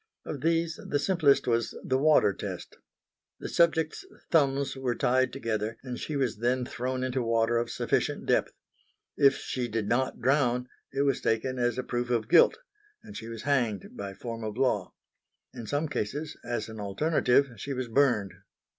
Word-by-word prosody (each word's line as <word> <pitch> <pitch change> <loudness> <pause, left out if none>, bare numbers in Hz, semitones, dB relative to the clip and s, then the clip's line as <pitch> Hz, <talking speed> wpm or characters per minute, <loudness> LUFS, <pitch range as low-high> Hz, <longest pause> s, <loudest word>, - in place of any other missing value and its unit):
Of 145 -4 -5
these 165 +1 +1
the 145 - -1
simplest 150 -3 +3
was 115 -2 0
the 130 0 +1
water 150 -8 +4
test. - - -7 0.6
The - - -5
subject's 170 - +2 0.3
thumbs 140 -3 +2
were 130 -2 -1
tied 130 +1 +2
together 115 -4 -3
and 125 -2 -5
she 155 - -4
was 130 -6 0
then 125 +2 +1
thrown 130 +1 -3
into 130 0 -1
water 115 0 +2
of 120 0 -2
sufficient - - -1
depth. - - +2 0.6
If 140 -2 +5
she 125 -2 -3
did 110 -2 -2
not 130 +3 0
drown, 125 -2 +2 0.2
it 135 +1 0
was 140 -2 +1
taken 125 +3 0
as 120 -1 +1
a 130 - -1
proof 120 0 -2
of 115 -3 0
guilt; - - +6 0.5
and 210 -2 -11
she 115 - -7
was 115 -1 -7
hanged 120 -8 0
by 100 -1 -6
form 115 +2 -6
of 110 +1 -5
law. 125 -8 0 0.6
In 115 - -8
some 145 +2 0
cases, 145 +3 -3
as 120 -3 -3
an 110 -1 -9
alternative, 130 +5 +2
she 140 +8 -6
was 130 -1 -3
burned. 115 -7 +2
125 Hz, 175 wpm, -28 LUFS, 115-140 Hz, 0.6 s, guilt